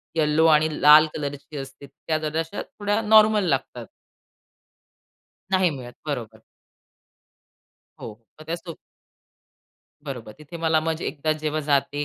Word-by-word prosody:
Yellow 155 0 +2
आणि 155 +1 +2
लाल 150 +1 +8
कलरची 145 0 -6
असते. 135 +1 -9
त्या 155 +3 -4
जराशा 160 +4 -3
थोड्या 205 +1 -2
नॉर्मल 215 -1 +5
लागतात. 130 -3 -2 1.7
नाही 185 -2 +3
मिळत. 125 -4 -8
बरोबर. 115 -6 -5 1.6
हो, - - -7 0.3
मग 155 - -12
त्या 165 +1 -2
सो 170 -1 -10 1.3
बरोबर. 120 -6 -7
तिथे 155 +3 -10
मला 160 -1 +1
मग 160 0 -3
एकदा 155 +1 -1
जेव्हा 155 0 -3
जाते 145 0 0
155 Hz, 120 wpm, -23 LUFS, 140-165 Hz, 1.7 s, लाल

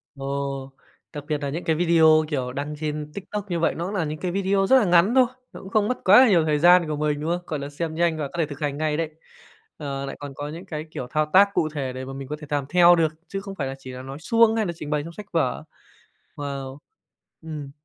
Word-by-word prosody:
Ồ! 135 0 -4 0.4
Đặc 145 -1 -6
biệt 150 -2 0
nà 140 -1 -4
những 165 +5 -4
cái 160 - +1
video, 160 -2 +5
kiểu, 130 -5 -3
đăng 145 +2 -4
trên 150 -1 -4
TikTok 205 +1 -5
như 170 - 0
vậy 165 - +1
nó 175 +4 -3
là 185 -6 -1
những 155 +1 -4
cái 180 -1 -2
video 195 0 +1
rất 265 - +6
là 225 - +3
ngắn 180 +7 +4
thôi, 260 -1 +7 0.3
nó - - -9
cũng 190 - -10
không 210 0 +2
mất 250 - -1
quá 195 +3 +7
là 245 - +5
nhiều 170 -5 +4
thời 150 -1 +1
gian 175 0 +6
của 150 - -2
mình, 150 -1 -1
đúng 160 - -2
không? 175 +1 -1
Gọi 155 -3 -3
là 140 +1 -5
xem 160 +2 -4
nhanh 170 -1 +1
và 145 -2 -2
có - - -20
thể 165 - +2
thực 145 -1 -9
hành 145 -2 -2
ngay 155 -1 0
đấy. 165 -2 -1 0.7
Ờ, 140 -2 -4
lại 135 - -6
còn 145 -1 -7
có 145 0 -5
những 170 +5 -8
cái, 155 -3 -5
kiểu, 125 - -5
thao 155 +4 0
tác 200 +2 +7
cụ 155 - +1
thể 135 -3 -3
để 130 0 -6
mà 135 - -7
mình 135 -1 -7
có 150 - -4
thể 150 - -10
làm 145 -2 -1
theo 175 -1 +6
được 160 -2 +1
chứ 195 0 -4
không 195 -1 -8
phải 140 -5 -3
là 135 - -5
chỉ 130 -1 -9
là 125 0 -8
nói 135 +3 -8
suông 230 +4 +3
hay 220 -2 +1
là 175 - -2
trình 150 -2 -7
bày 150 -1 0
trong 170 +1 -9
sách 205 +1 -11
vở. 155 -7 0 0.7
Wow! 140 -1 -5 0.6
Ừm. 150 -4 -7
155 Hz, 275 wpm, -24 LUFS, 145-175 Hz, 0.7 s, thôi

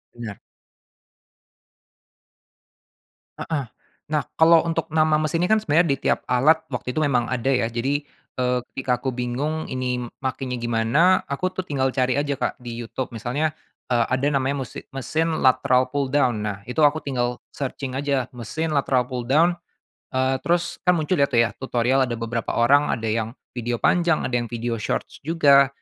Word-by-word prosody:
Benar. 115 -4 -7 3.0
Heeh. 150 -5 -2 0.5
Nah, 150 -2 +1
kalau 165 0 +6
untuk 165 -1 -2
nama 155 -1 +3
mesin 155 +2 0
ini - - 0
kan 220 +2 +3
sebenarnya 165 -2 +3
di - - -16
tiap - - 0
alat 155 +6 +3
waktu 125 - -3
itu - - +3
memang 130 -6 +1
ada 130 0 -2
ya, 115 -3 +1
jadi, 130 +5 -1 0.3
eee, 125 0 +1
ketika 125 -2 0
aku 130 -1 -2
bingung 130 +6 -2
ini 125 -1 -2 0.2
makenya 130 -1 -3
gimana, 120 +10 +3
aku 185 +7 -2
tuh 185 - -2
tinggal 135 -6 -1
cari 130 0 +1
aja, 145 0 0
Kak, - - -2
di 120 -1 -7
YouTube. 120 +1 -5
Misalnya, 130 +7 -1 0.3
eee, 120 -2 +2
ada 130 +2 +1
namanya 135 0 0
musi - - -9
mesin 160 +4 -1
lateral 130 0 +4
pull 140 -2 0
down. 130 -6 +2
Nah, 105 -2 -3
itu 125 +6 -2
aku 150 +1 +4
tinggal 125 -3 -1 0.2
searching 135 -1 -4
aja 135 -2 0
mesin 155 +7 -3
lateral 135 -3 +2
pull 125 -1 -4
down, 165 +6 +4 0.6
eee, 130 0 0
terus 175 0 -1
kan 180 -1 +3
muncul 155 0 0
deh 140 - +4
tuh 115 -3 +4
ya 115 - -3
tutorial 130 0 +1
ada 120 - -3
beberapa 115 0 -3
orang 140 +5 +4
ada 115 -1 -5
yang 110 +2 -2 0.2
video 120 -1 -2
panjang, 175 +3 +2
ada - - -3
yang 120 - -5
video 115 -1 -3
shorts - - -3
juga, 140 -4 +5
130 Hz, 170 wpm, -23 LUFS, 120-150 Hz, 3.0 s, kalau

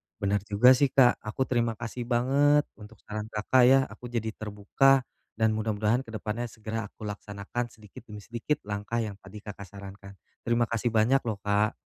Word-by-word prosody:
Bener 100 +1 0
juga 110 +5 +6
sih, 130 +2 +5
Kak. 130 -2 +4
Aku 110 +5 -2
terima 120 -3 0
kasih 120 +2 -6
banget 140 +4 +3 0.2
untuk 105 +1 -12
saran 105 0 -5
Kakak 110 +4 +2
ya, 135 +1 +7
aku 120 +1 -9
jadi 115 -2 -2
terbuka. 110 +6 +2 0.3
Dan 110 -1 +2
mudah-mudahan 110 +2 0
ke - - -10
depannya 110 +2 -4
segera 110 0 -5
aku 110 - -14
laksanakan 105 +3 -5
sedikit 105 -3 -14
demi 105 - -8
sedikit 120 +7 -2
langkah 105 +2 -3
yang 105 -2 -4
tadi 95 +3 -11
Kakak 100 -1 -8
sarankan. 100 0 -11 0.3
Terima 120 0 +1
kasih 115 +1 -1
banyak 115 +4 +3
loh, 110 -3 -3
Kak. 105 +1 +1
110 Hz, 175 wpm, -28 LUFS, 105-120 Hz, 0.3 s, ya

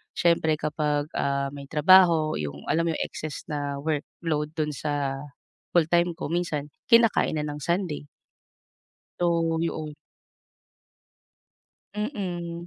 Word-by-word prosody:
siyempre 165 -2 +3
kapag, 150 -1 -1
ah, 140 0 -1
may 140 -1 -9
trabaho 160 0 +5
'yong, 70 -1 -5
alam 165 +1 +2
mo 160 - 0
'yong - - -1
excess 155 -2 -6
na 145 -1 -2
workload 155 0 -2
do'n 150 -1 -1
sa 145 -2 -2 0.6
full-time 170 +1 +3
ko 165 -2 -5
minsan, 150 -4 -2 0.2
kinakain 230 -7 +4
na 150 - -1
ng 150 0 -4
Sunday. 170 -2 -2 1.1
So 165 -2 +1
'yon. 155 -2 -3 2.0
Mm. 175 - -4
155 Hz, 115 wpm, -26 LUFS, 145-170 Hz, 2.0 s, trabaho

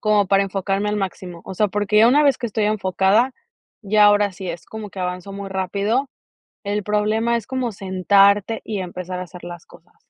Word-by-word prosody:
como 210 -2 +2
para 195 +1 +3
enfocarme 195 +1 -2
al 210 - -1
máximo. 185 -3 -5
O 190 - -7
sea, 210 +2 +1
porque 210 +1 +1
ya 225 +2 +7
una 290 +4 +4
vez 280 -2 +3
que 240 - -3
estoy 215 -1 -1
enfocada, 210 +4 +2 0.5
ya 210 +1 +4
ahora 205 -1 +4
sí 185 0 -7
es, 170 0 -6
como 215 -2 -8
que 190 - -8
avanzo 180 +2 -4
muy 200 0 -6
rápido. 200 +7 -1 0.6
El 205 +1 -2
problema 215 +3 +1
es 230 - -5
como 255 -3 -2
sentarte 200 +3 +2
y 205 -3 -4
empezar 180 0 -6
a - - -3
hacer 180 0 -11
las 175 -1 -9
cosas. 170 - -20
200 Hz, 200 wpm, -21 LUFS, 190-215 Hz, 0.6 s, ya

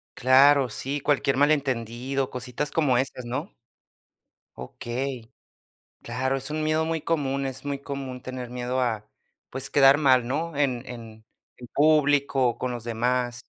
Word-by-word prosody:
Claro, 135 +1 +5
sí, 135 +6 -3
cualquier 135 -1 +1
malentendido, 135 -2 0
cositas 125 +3 -4
como 145 -6 +2
esas, 125 0 -2
¿no? 135 - -4 1.0
Okey. 120 - -5 0.7
Claro, 130 +3 -2
es 135 +2 -5
un 155 0 -2
miedo 155 +1 +1
muy 165 -1 -2
común, 140 -4 -1
es 130 -1 -5
muy 140 -1 -3
común 135 -3 -6
tener 130 -1 -6
miedo 125 +1 -2
a, 110 -4 -2 0.4
pues, 135 +1 -4
quedar 135 0 +6
mal, 130 -5 +3
¿no?, 160 +5 -2
en 130 -4 0
en 110 -2 -10 0.3
en 125 - -11
público 145 -3 +3
o 120 - -5
con 125 -1 -3
los 120 -2 -6
demás. 120 +1 -1
130 Hz, 145 wpm, -25 LUFS, 125-140 Hz, 1.0 s, quedar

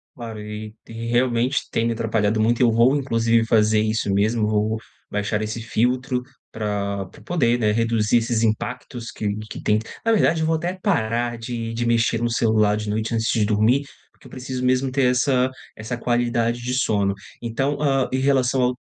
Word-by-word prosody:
Claro, 115 -3 -7
e 105 0 -7
e 115 - -11
realmente 120 +2 +1
tem 115 - 0
me 115 - +1
atrapalhado 110 -1 0
muito. 115 +3 +2
Eu 120 -2 +5
vou 120 +5 +4
inclusive 115 -4 +2
fazer 110 -1 +3
isso 110 -2 0
mesmo, 105 +2 +1
vou 110 +1 0 0.3
baixar 105 +1 -1
esse 110 +2 -4
filtro 125 +3 0 0.3
pra 100 -2 -2
pra - - -16
poder, 125 -9 +1
né, 105 -2 +2
reduzir 115 0 +2
esses 115 -1 0
impactos 115 +2 -3
que 105 -1 -3
que - - -7
tem 105 0 +2 0.3
na 225 - +3
verdade, 170 -6 +3
eu 160 - +1
vou 165 - +2
até 175 +3 -2
parar 120 - 0
de 115 -1 -5
de 120 +1 -2
mexer 115 0 +2
no 120 - +1
celular 110 -3 +2
de 105 0 -4
noite 110 +2 -2
antes 115 -1 0
de 110 -2 +2
dormir, 110 +6 +2 0.3
porque - - -18
eu - - -17
preciso 130 0 -4
mesmo 130 +1 +2
ter 135 -1 +2
essa 130 0 +2 0.3
essa 115 +3 -5
qualidade 120 0 0
de 125 +1 -3
sono. 105 -7 +1 0.3
Então, 135 +5 -1
hã, 135 -3 +1
em 130 - 0
relação 130 -1 +2
ao 125 0 +1
115 Hz, 185 wpm, -22 LUFS, 110-125 Hz, 0.3 s, Eu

